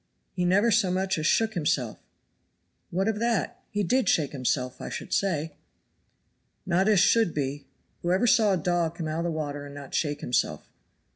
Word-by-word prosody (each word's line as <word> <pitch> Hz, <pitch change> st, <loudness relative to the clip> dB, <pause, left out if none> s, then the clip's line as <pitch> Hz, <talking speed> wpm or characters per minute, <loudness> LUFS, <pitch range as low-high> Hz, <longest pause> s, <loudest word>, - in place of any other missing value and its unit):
"He 180 Hz, -1 st, -1 dB
never 200 Hz, +6 st, +3 dB
so 205 Hz, -3 st, +3 dB
much 190 Hz, -1 st, 0 dB
as 155 Hz, -, 0 dB
shook 225 Hz, +4 st, +2 dB
himself." 145 Hz, -, -1 dB, 0.9 s
"What 190 Hz, +4 st, -1 dB
of 220 Hz, -1 st, 0 dB
that? 235 Hz, -2 st, -1 dB
He 205 Hz, 0 st, -1 dB
did 255 Hz, +7 st, +2 dB
shake 150 Hz, -4 st, +2 dB
himself, 130 Hz, -1 st, -2 dB
I -, -, -5 dB
should -, -, -6 dB
say." 165 Hz, -5 st, 0 dB, 1.1 s
"Not 185 Hz, +2 st, +2 dB
as 210 Hz, -3 st, +5 dB
should 200 Hz, 0 st, +3 dB
be. 140 Hz, -1 st, -3 dB, 0.3 s
Who 175 Hz, -, -1 dB
ever 190 Hz, +6 st, +2 dB
saw 215 Hz, -3 st, +4 dB
a -, -, +2 dB
dog 170 Hz, -1 st, 0 dB
come 165 Hz, -2 st, -4 dB
out 155 Hz, +1 st, -2 dB
of 170 Hz, -, -2 dB
the -, -, 0 dB
water 145 Hz, -3 st, -4 dB
and 140 Hz, 0 st, -10 dB
not 140 Hz, -1 st, -10 dB
shake 145 Hz, -2 st, -1 dB
himself? 120 Hz, -, -1 dB
175 Hz, 190 wpm, -27 LUFS, 145-200 Hz, 1.1 s, as